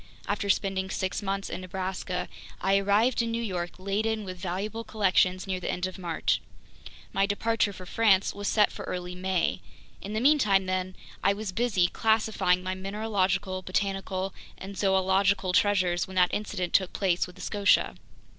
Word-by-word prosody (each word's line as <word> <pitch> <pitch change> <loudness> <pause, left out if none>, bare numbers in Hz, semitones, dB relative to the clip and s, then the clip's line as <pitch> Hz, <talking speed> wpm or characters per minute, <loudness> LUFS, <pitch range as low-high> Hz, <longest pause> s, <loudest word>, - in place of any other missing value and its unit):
After 205 0 -1
spending 190 -1 +1
six 190 +1 -2
months 195 0 -2
in - - -5
Nebraska, 185 -1 -3 0.3
I 195 +1 +3
arrived 210 +5 +3
in 230 - -1
New 230 0 -1
York 180 -5 -3
laden 215 +3 -1
with 185 -1 -7
valuable 195 +5 -3
collections 185 -4 +2
near 190 -2 -2
the - - -4
end 180 - -1
of 185 0 -6
March. 170 -3 0 0.7
My 195 0 +2
departure 215 +1 +1
for 185 -2 -10
France 200 0 +3
was 205 0 -4
set 210 -2 +4
for - - -7
early 180 0 -4
May. 180 - -1 0.4
In 205 - -6
the 215 - 0
meantime, 225 -8 +4
then, 185 0 -2 0.3
I 195 - +4
was 205 -1 -4
busy 200 -3 +2
classifying 220 -4 +1
my 185 0 -2
mineralogical, 195 -1 -1
botanical, 195 0 -2 0.2
and 195 +1 -8
zoological 190 0 +2
treasures 185 -3 +2
when 190 - -10
that 180 -1 +3
incident 200 -4 -2
took 185 -2 +3
place 180 -3 +1
with 180 - -13
the - - -12
Scotia. 205 -1 +3
195 Hz, 165 wpm, -28 LUFS, 185-205 Hz, 0.7 s, set